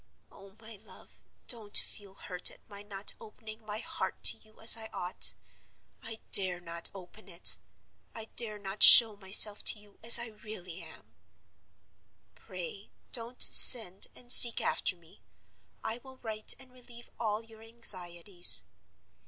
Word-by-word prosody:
Oh, 195 0 -21
my 220 -1 -13
love, 215 - -18 0.2
don't 220 -4 -2
feel 200 -2 -9
hurt 180 -2 0
at - - -18
my 200 -1 -14
not 200 -1 -6
opening 220 0 -16
my 210 0 -8
heart 225 - -9
to - - +6
you 215 0 -27
as 225 +1 +5
I 220 -1 -8
ought! 180 -3 -1 0.7
I 225 -1 -10
dare 185 -3 +1
not 170 -1 -7
open 195 +3 -17
it. 175 0 0 0.6
I 225 - -10
dare 215 -3 -2
not 200 0 -10
show 225 -3 +8
myself 205 +1 +3
to 215 - +2
you 205 -1 -21
as 230 +1 +8
I 235 - -6
really 210 -5 -12
am. - - -18 1.2
"Pray 190 +1 -12 0.2
don't 240 0 0
send 205 -7 +4
and 245 -1 -12
seek 235 -2 +7
after 185 - -5
me; 170 -2 -26 0.6
I 230 +2 -7
will 260 +1 -20
write 215 -3 -3
and 260 -1 -15
relieve 240 -1 -17
all 215 -1 -7
your 225 -1 -20
anxieties. 185 -5 -2
215 Hz, 150 wpm, -26 LUFS, 190-225 Hz, 1.2 s, show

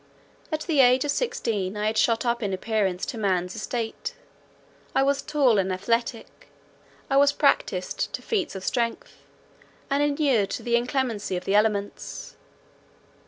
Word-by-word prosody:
At 310 0 -1
the 315 -4 0
age 255 +1 +5
of 290 - +1
sixteen 210 - -1
I 210 - -1
had 215 +1 0
shot 230 +2 +2
up 235 0 0
in 200 -3 -1
appearance 195 -2 -1
to 230 - -5
man's 185 -3 0
estate; 230 -2 -4 0.8
I 270 - +4
was 280 0 +1
tall 270 -8 +3
and 190 0 0
athletic; 230 +5 -2 0.6
I 270 - +2
was 285 0 +6
practised 210 -10 0
to - - -5
feats 380 - -1
of 190 - -6
strength, 235 +1 -2 0.7
and 280 +1 +2
inured 285 -8 +2
to - - -4
the 235 -1 +1
inclemency 235 -6 -1
of 180 - -7
the 195 - 0
elements. 205 -1 -1
230 Hz, 155 wpm, -25 LUFS, 200-275 Hz, 0.8 s, was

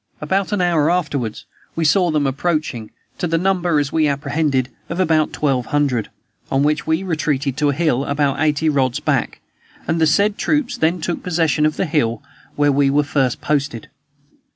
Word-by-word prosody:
About 190 +6 -1
an 205 -3 0
hour 165 -4 +2
afterward, 145 -10 -1 0.3
we 165 - -1
saw 175 +4 +3
them 150 -2 +1
approaching, 135 -5 -2 0.3
to 175 - -1
the 165 0 +1
number, 180 -2 +1
as 145 -1 0
we 155 -1 +3
apprehended, 140 -2 0 0.2
of 170 - -4
about 160 -4 +2
twelve 135 -5 -1
hundred, 140 -7 0 0.4
on 135 +1 +2
which 150 +1 0
we 160 +3 +1
retreated 150 -6 -1
to 150 -1 +2
a - - +1
hill 140 -3 0
about 140 -1 0
eighty 155 0 +1
rods 135 -5 +1
back, - - -1 0.5
and 165 +1 0
the 160 - +5
said 200 +7 +2
troops 295 -5 0
then 165 +2 0
took 170 +2 -3
possession 160 -4 +1
of 155 - -3
the - - 0
hill 130 -8 0 0.3
where 145 0 +3
we 140 0 +3
were 145 +2 +2
first 135 -4 0
posted. 140 -6 -2
150 Hz, 180 wpm, -19 LUFS, 140-165 Hz, 0.5 s, the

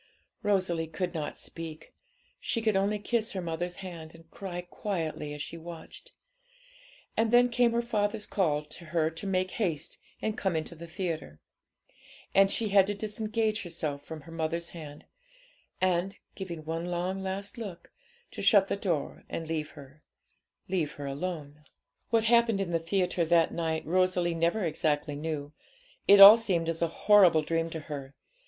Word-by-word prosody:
Rosalie 185 -5 +1
could 175 +2 -3
not 155 -3 -4
speak; 165 -1 -7 0.5
she 230 - -1
could 220 -2 +1
only 200 +2 +2
kiss 220 +2 -1
her 190 - -3
mother's 175 +1 -3
hand, 165 -3 -8
and 165 0 -18
cry 180 -3 -5
quietly 170 -5 -4
as 150 0 -4
she 165 - -6
watched. 170 - -10 1.0
And 225 0 +2
then 245 +1 +6
came 240 -1 +3
her 235 0 +1
father's 210 -2 -1
call 150 -6 0
to 160 +3 -11
her 160 0 0
to 165 +5 -6
make 185 -1 0
haste 170 -9 -2 0.2
and 220 -1 -2
come 190 -7 -1
into 160 +1 -3
the 170 +1 -10
theatre; 160 - -4 0.9
and 195 0 +6
she 220 +1 -1
had 195 -1 +5
to 205 - -2
disengage 215 +1 -1
herself 155 -5 -4
from 160 +1 -8
her 165 - -13
mother's 165 +1 -2
hand, 150 -3 -10 0.7
and, 185 +1 +1 0.2
giving 170 -5 -7
one 165 +2 -3
last 190 +3 -3
long 225 - -3
look, 175 -2 -15 0.4
to - - -7
shut 200 -3 +5
the - - +1
door 170 -8 -2
and 165 - -4
leave 155 -1 -2
her 140 +2 -13 0.7
leave 170 -5 -1
her 145 - -7
alone. 150 0 -5 0.5
What 225 -1 +3
happened 230 -2 +4
in 190 -3 -2
the 165 - +1
theatre 180 +1 0
that 165 0 +3
night 160 -1 -2
Rosalie 180 0 +2
never 170 +5 +1
exactly 150 -2 0
knew; 150 -1 -4 0.5
it 200 0 +8
all 200 +3 +13
seemed 175 -7 0
as 165 0 -3
a 170 - +3
horrible 175 -2 +5
dream 165 +1 -1
to 160 -1 -6
her. 140 -2 -7
175 Hz, 165 wpm, -29 LUFS, 160-200 Hz, 1.0 s, all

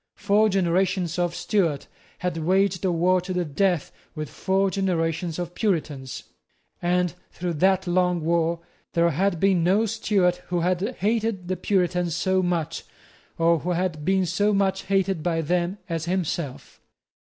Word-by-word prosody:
Four 210 +1 +3
generations 185 -1 +1
of 175 -1 0
Stuarts 175 -5 0 0.3
had 180 -1 -2
waged 185 +3 +1
a 185 - +2
war 180 +2 +2
to 185 +1 -5
the 180 -1 0
death 170 +2 0 0.2
with 155 -1 -5
four 195 0 +1
generations 170 -3 -1
of 175 -1 -4
Puritans; 155 - -2 0.6
and, 180 0 +1 0.2
through 175 -1 -3
that 190 +1 +3
long 180 -1 +1
war, 170 0 +1 0.3
there 170 0 +3
had 180 +3 0
been 190 -2 +3
no 195 +6 +3
Stuart 200 -5 +1
who 175 -1 -1
had 185 +7 0
hated 215 -3 0
the 185 - 0
Puritans 180 -4 0
so 190 +2 +1
much, 170 -3 -2 0.5
or 165 0 +3
who 180 +4 -2
had 170 -3 -2
been 190 +2 +2
so 205 +5 +1
much 195 -1 0
hated 195 -3 +1
by 165 0 0
them, 175 +4 0
as 165 -2 -3
himself. 170 -6 -3
180 Hz, 155 wpm, -24 LUFS, 170-190 Hz, 0.6 s, Four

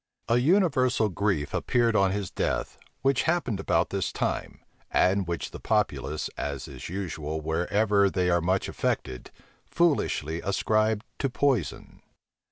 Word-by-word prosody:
A 115 - +3
universal 130 - +3
grief 95 -6 -1
appeared 120 -2 +1
on 95 -1 +4
his 100 -1 -3
death, - - -2 0.2
which 135 -1 +3
happened 145 - 0
about 85 -3 +1
this 100 -1 -1
time, - - -3 0.3
and 95 0 +2
which 85 -1 -3
the - - -8
populace, 75 - -1
as 70 -2 -4
is 65 0 -8
usual 80 -5 -4
wherever 100 +6 +2
they 90 -1 0
are 85 0 +3
much 95 +3 0
affected, 65 -2 -3 0.4
foolishly 135 - +1
ascribed 110 +2 +1
to 135 - 0
poison. 125 - -1
100 Hz, 135 wpm, -27 LUFS, 85-120 Hz, 0.4 s, on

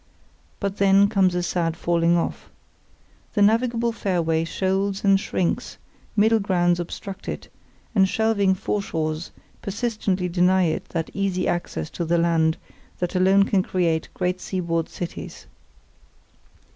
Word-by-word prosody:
But 200 -1 -3
then 200 0 +5
comes 190 -4 +2
a 180 - 0
sad 170 -2 -1
falling 170 0 +2
off. 170 - -3 0.9
The 205 - +4
navigable 230 +2 +2
fairway 170 -6 0
shoals 195 +3 -1
and 195 -1 +5
shrinks, 185 -3 -2 0.4
middle 220 +1 +4
grounds 175 -3 +1
obstruct 190 +3 -6
it, - - -6 0.4
and 190 -3 +4
shelving 205 -3 +2
foreshores 165 -5 -2 0.3
persistently 200 -3 -1
deny 180 +1 +3
it 160 -2 -1
that 165 -1 -3
easy 190 -2 -1
access 80 - -3
to - - -3
the 170 +1 +1
land 165 -1 +2 0.4
that 180 -1 -2
alone 190 +2 +4
can 195 -1 +2
create 170 -4 0
great 180 0 -1
seaboard 170 -3 -2
cities. 175 -1 -7
185 Hz, 130 wpm, -23 LUFS, 170-200 Hz, 0.9 s, then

